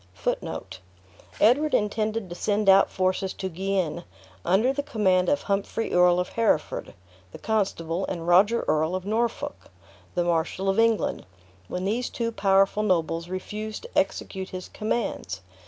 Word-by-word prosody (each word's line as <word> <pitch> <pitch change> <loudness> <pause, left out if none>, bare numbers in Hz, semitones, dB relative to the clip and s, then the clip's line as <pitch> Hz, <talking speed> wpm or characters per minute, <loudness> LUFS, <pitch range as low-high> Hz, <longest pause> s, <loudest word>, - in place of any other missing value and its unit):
Edward 280 +8 +4
intended 215 0 -1
to 175 - -7
send 205 +2 0
out 195 0 +6
forces 185 0 0
to 190 - -4
Guienne, 185 -2 -2 0.4
under 220 +9 +3
the 285 - -1
command 190 -9 +2
of 285 - +1
Humphrey 200 +2 -2
Earl 180 0 +5
of 180 - -2
Hereford, 225 -9 0 0.4
the - - -9
constable, 190 -5 -1
and 170 -2 -4
Roger 200 +7 +4
Earl 160 +3 +1
of 185 0 -4
Norfolk, 230 +3 -2 0.5
the 175 - +2
Marshal 170 +3 0
of 195 - +1
England, 225 - +1 0.4
when 180 +1 -4
these 235 +5 -1
two 230 -1 -2
powerful 195 -1 +3
nobles 170 -4 0
refused 210 - -5
to 480 - -12
execute 190 -1 -1
his 185 -1 -7
commands. 210 - -3
195 Hz, 140 wpm, -26 LUFS, 180-220 Hz, 0.5 s, out